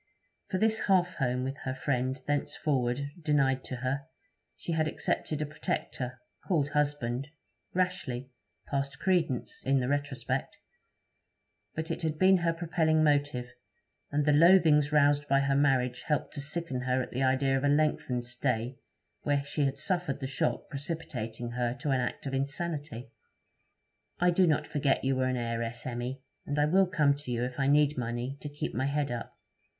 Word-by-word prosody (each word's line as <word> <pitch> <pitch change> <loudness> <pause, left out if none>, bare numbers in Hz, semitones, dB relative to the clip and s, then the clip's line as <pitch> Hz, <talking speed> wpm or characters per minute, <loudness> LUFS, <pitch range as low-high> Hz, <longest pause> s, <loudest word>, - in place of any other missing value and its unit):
For 185 - 0
this 220 +2 +2
half 180 -2 +3
home 125 -2 0
with 135 +1 -3
her 130 -2 -4
friend 130 0 -1
thenceforward 140 -2 -1
denied 135 -4 +2
to 130 - -4
her, 140 +3 -1 0.5
she - - -5
had 160 -1 +1
accepted 155 0 -1
a - - -2
protector, 130 -3 -4 0.2
called 150 -6 +1
husband 145 -3 -1 0.5
rashly, 135 -9 -1 0.3
past 140 0 -2
credence, 170 -9 0
in 135 +1 +3
the 125 - -1
retrospect; 145 -1 -2 1.2
but 160 +1 -3
it - - -3
had 155 -2 -1
been 190 +2 +6
her 170 -1 +1
propelling 160 -1 +1
motive; 145 -4 +1 0.6
and 145 0 +1
the 150 - +4
loathings 155 -2 +6
roused 145 0 +4
by 135 0 +4
her 140 0 +1
marriage 130 -3 +2
helped 150 -2 -1
to 140 - -3
sicken 150 -3 -2
her 125 0 +1
at - - -9
the 130 - -2
idea 135 +1 +3
of 135 - 0
a - - +3
lengthened 145 -4 +1
stay 120 0 -2 0.4
where 145 -1 +1
she 145 0 0
had 135 0 -1
suffered 175 -7 -1
the 135 - -4
shock 135 +4 -1
precipitating 130 -6 -5
her 120 0 -1
to 140 +1 -2
an 130 - +2
act 125 - -3
of 135 - -3
insanity. 140 -3 -3 1.1
'I 180 0 +4
do 180 +1 +4
not 150 -1 +2
forget 140 -2 +1
you 135 0 +2
were 130 0 +1
an 130 -1 0
heiress, 115 0 -3
Emmy, 125 +2 -4 0.2
and 145 - -2
I 150 - +4
will 190 +5 +4
come 150 -5 +3
to 145 -3 -9
you 120 0 0
if 125 +1 -4
I 135 - +2
need 145 -1 +4
money 120 +3 -3
to 145 - -5
keep 145 +1 -4
my 130 +3 0
head 140 -1 0
up. 120 -1 -5
140 Hz, 175 wpm, -30 LUFS, 130-150 Hz, 1.2 s, been